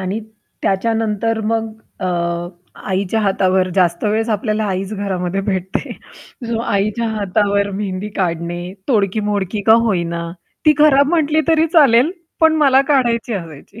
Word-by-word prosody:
आणि 190 +3 -3 0.4
त्याच्यानंतर 225 +2 0
मग 225 0 -1 0.3
अ, 185 - -2 0.8
आईच्या 195 +3 0
हातावर 190 -2 +1
जास्त 175 -1 +1
वेळेस 220 +2 0
आपल्याला 215 0 -1
आईच 195 0 -3
घरामध्ये 195 -2 -2
भेटते. 190 -2 -2 0.6
जो 230 -1 -1
आईच्या 215 +1 -1
हातावर 200 -1 0
मेहंदी 195 0 -4
काढणे, 175 -1 -2 0.3
तोडकी 210 -4 +1
मोडकी 205 0 -2
का 220 - +8
होईना, 170 -5 -1 0.4
ती 305 - +8
खराब 285 -2 +5
म्हंटली 315 -2 +2
तरी 320 0 +4
चालेल, 275 -3 +5 0.3
पण 320 -1 +5
मला 270 -2 +5
काढायची 240 -3 +1
असायची. 170 +2 -8
210 Hz, 130 wpm, -18 LUFS, 190-230 Hz, 0.8 s, का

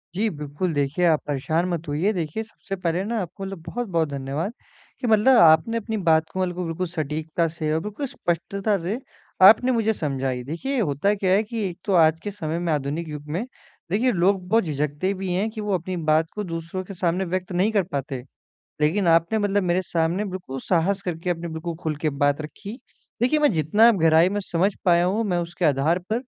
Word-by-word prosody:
जी, 215 +3 +1
बिल्कुल 150 +2 -3
देखिए 145 +5 0
आप 160 -3 +4
परेशान 155 +4 0
मत 170 -2 -3
होइए। 160 +9 +1
देखिए 175 +4 -3
सबसे 215 -2 -7
पहले 180 0 -1
ना 230 +1 -1
आपको 190 +2 -7
मतलब 195 -2 -6
बहुत-बहुत 180 -10 -1
धन्यवाद 140 +8 -3 0.5
कि 250 - -1
मतलब 225 +3 +5
आपने 160 +8 +5
अपनी 220 0 -3
बात 160 -4 +2
को 190 - -5
बिल्कुल, 180 -1 -1
बिल्कुल 165 +2 -3
सटीकता 160 0 -2
से 160 -1 -3
और 160 - +1
बिल्कुल 210 +8 -4
स्पष्टता 195 +2 -1
से 205 +9 -2 0.4
आपने 220 +7 +8
मुझे 220 -2 +2
समझाई। 135 -6 -2
देखिए 245 - -3
होता 165 +2 +1
क्या 190 -2 0
है 205 +3 +4
कि 225 +1 -5
एक 170 - -9
तो 200 - 0
आज 160 -1 +5
के 205 - -3
समय 165 -4 -3
में 175 -1 -1
आधुनिक 150 +4 -2
युग 150 0 -7
में 185 +9 -2 0.5
देखिए 240 +6 +2
लोग 185 0 +1
बहुत 225 +2 +4
झिझकते 150 +3 -1
भी 190 -1 -4
हैं 200 +5 0
कि 215 -1 -6
वो 205 -1 -1
अपनी 185 +1 -4
बात 160 +1 +3
को 210 - -3
दूसरों 170 +1 -5
के 195 - -9
सामने 180 +1 0
व्यक्त 185 +1 -3
नहीं 185 +5 +2
कर 200 -3 +2
पाते। 140 -6 -4 0.6
लेकिन 170 +6 +2
आपने 165 +6 +3
मतलब 205 -1 +1
मेरे 180 +1 +1
सामने 170 +4 0
बिल्कुल 180 -9 -6
साहस 190 +5 +1
करके, 175 -1 -3
आपने 170 0 -3
बिल्कुल 160 +1 -5
खुल 155 -2 -2
के 155 0 -1
बात 145 +1 +3
रखी। 200 - -8 0.4
देखिए 280 +5 +3
मैं 295 - +4
जितना 185 +9 +4
गहराई 165 -2 +4
में 205 +2 -2
समझ 190 +1 0
पाया 175 -1 +4
हूँ 200 +5 +1
मैं 180 -4 0
उसके 175 +1 -3
आधार 150 +4 +3
पर 235 +3 0
175 Hz, 205 wpm, -24 LUFS, 160-200 Hz, 0.6 s, आपने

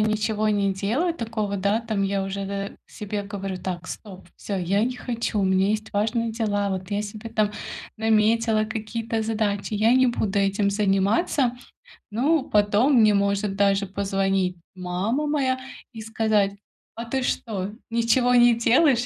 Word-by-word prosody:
ничего 215 0 +1
не 200 -2 +1
делаю 235 - 0
такого, 220 -7 -3
да, 200 +4 +1
там, 220 -3 -1
я 195 0 0
уже 195 0 -4
д 200 0 -5
себе 205 0 -5
говорю: 195 -2 -5
"Так, 180 -1 -5
стоп, 195 -4 -9
всё, 200 - -4
я 190 +3 +1
не 250 +1 -3
хочу. 235 -3 -3
У 200 - +2
меня 190 +1 +2
есть 215 0 -2
важные 225 +2 0
дела, 205 -3 -1
вот 190 0 -4
я 205 0 0
себе 210 +2 -7
там 215 -2 +1 0.5
наметила 220 0 +2
какие-то 220 +1 -3
задачи, 215 -2 -1
я 220 +3 +3
не 260 0 +5
буду 210 -4 0
этим 200 +1 +1
заниматься". 210 - +1 0.6
Ну, 270 +7 +1
потом, 210 +6 +3
мне 215 -1 +5
может 200 0 0
даже 200 0 +3
позвонить 195 -1 0 0.2
мама 190 +11 -2
моя 270 -3 0 0.3
и 225 - -10
сказать: 220 -2 +1 0.4
"А 230 - -5
ты 260 +3 -2
что, 205 -5 -2 0.2
ничего 235 +2 +2
не 240 -1 +6
делаешь?" 245 +1 +3
210 Hz, 155 wpm, -24 LUFS, 200-230 Hz, 0.6 s, не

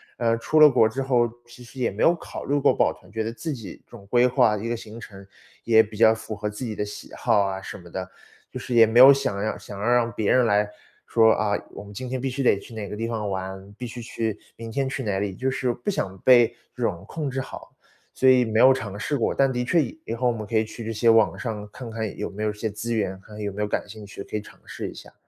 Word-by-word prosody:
呃， 115 -1 +1
出 155 +6 +2
了 150 - +10
国 110 -5 +4
之 130 +5 -3
后， 125 -3 +2 0.2
其 120 +1 -15
实 125 +3 -12
也 120 - +1
没 100 - -6
有 170 - +5
考 - - -8
虑 145 - +1
过 140 - +4
报 - - +2
团， 90 - -20
觉 110 +1 -3
得 115 - -3
自 160 +7 -5
己 115 -9 -8
总 100 -5 -14
规 120 +4 +4
划 125 -4 +3
一 110 +3 -4
个 120 - -1
行 110 0 -10
程， 100 -4 -11 0.4
也 110 -1 +6
比 105 0 -10
较 110 0 +6
符 110 - -7
合 105 0 -3
自 105 +5 -7
己 115 -3 -3
的 105 - -1
喜 105 - -9
好 105 - +3
啊 95 -1 -2
什 - - -8
么 85 -1 -14
的， 95 +1 -5 0.4
就 - - -7
是 125 - -5
也 115 -1 +7
没 110 +2 0
有 135 +2 +11
想 100 -7 -2
要 110 - -2
想 100 - -10
要 100 - -4
让 120 -1 +3
别 105 -1 0
人 125 -1 +4
来 105 -2 +3 0.4
说， 110 -1 +5
啊， 105 -1 0 0.2
我 - - -9
们 100 0 -12
今 130 +5 -6
天 130 0 -3
必 135 - -1
须 130 +2 -3
得 125 - +4
去 100 - -12
哪 110 -2 -5
个 - - -6
地 115 +2 -3
方 110 -3 -3
玩， 95 +1 -6
必 125 - -6
须 120 +1 -7
去 115 -3 -3 0.2
明 115 0 -8
天 135 +2 -1
去 135 - -4
哪 100 -3 -1
里， 100 -2 -3
就 130 +6 -1
是 130 -2 -1
不 120 - -3
想 95 - -3
被 120 +2 +6 0.3
这 125 - -10
种 90 -6 -1
控 150 +1 -4
制 135 0 -3
好， - - -10 0.4
所 130 - +2
以 125 -1 +6
没 110 0 0
有 130 +2 +8
尝 105 -6 -5
试 145 - -1
过， 115 - 0
但 135 -1 +3
的 125 -1 -1
确 165 +5 +3
以 140 +5 -8
以 115 - -4
后 125 +2 0
我 120 - +3
们 110 -2 -6
可 115 - 0
以 110 - +3
去 115 +2 -9
这 115 - -3
些 115 +2 +2
网 115 -1 +4
上 105 -4 -5
看 125 0 -8
看 110 -2 -4
有 - - -3
没 100 +2 -8
有 105 - +1
些 110 +1 -3
资 110 +3 -4
源， 95 -4 -2
看 105 +1 -13
有 105 -1 -3
没 105 - -4
有 105 - 0
感 105 - -2
兴 105 0 -10
趣， 100 0 -8
可 - - -8
以 - - -4
尝 - - -16
试 - - -6
一 - - -10
下。 - - -13
115 Hz, 310 characters per minute, -24 LUFS, 105-125 Hz, 0.4 s, 有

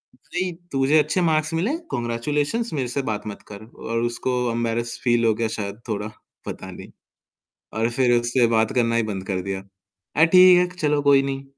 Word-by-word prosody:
नहीं 175 +7 -4 0.2
तुझे 135 +3 +3
अच्छे 155 +5 +1
मार्क्स 155 +1 0
मिले 210 - 0
कांग्रेचुलेशंस 145 - -2
मेरे 135 -4 -1
से 140 - -1
बात 105 0 -5
मत 105 - -7
कर 105 +1 -9 0.2
और 115 0 -1
उसको 120 +1 -1 0.2
एम्बैरस 115 0 -1
फील 120 -2 +2
हो 110 - +4
गया 115 0 -1
शायद 100 +1 -5
थोड़ा 105 0 -2 0.4
पता - - -7
नहीं। - - -11 0.9
और 115 +1 +1
फिर 120 0 +2
उससे 120 +1 +2
बात 110 0 +2
करना 115 -2 +2
ही 115 - +2
बंद 100 -3 -5
कर 95 -2 -2
दिया 95 0 -4 0.5
अ, 160 - +6
ठीक 180 +1 +7
है, 180 - +3
चलो 150 -2 +1
कोई 140 -1 +5
नहीं। 135 0 -4
120 Hz, 185 wpm, -23 LUFS, 115-150 Hz, 0.9 s, ठीक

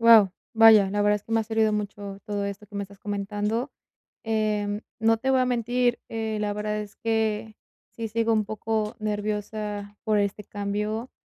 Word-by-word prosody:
Guau. 225 -4 +8 0.2
Vaya, 220 -3 +8
la 205 +1 0
verdad 205 0 +4
es 205 - -9
que 225 - -8
me 225 - +4
ha - - 0
servido 220 0 +2
mucho 205 -1 -4
todo 205 -2 -2
esto 200 +1 -5
que 205 - -17
me 200 - -2
estás 200 0 -11
comentando. 210 +5 -2 0.5
Em, 215 -1 0 0.2
no 225 0 +4
te 265 +4 0
voy 260 -1 +4
a 255 - +3
mentir, 245 0 +1
eh, 220 -1 -2
la 210 -1 0
verdad 210 +1 -2
es 205 -1 -9
que 220 -1 -1 0.4
sí 230 -1 -3
sigo 230 +1 +1
un 215 -1 +2
poco 215 +1 -2
nerviosa 210 -1 -3
por 215 -2 +2
este 205 +1 -1
cambio, 210 +4 -3
215 Hz, 185 wpm, -26 LUFS, 205-225 Hz, 0.5 s, Guau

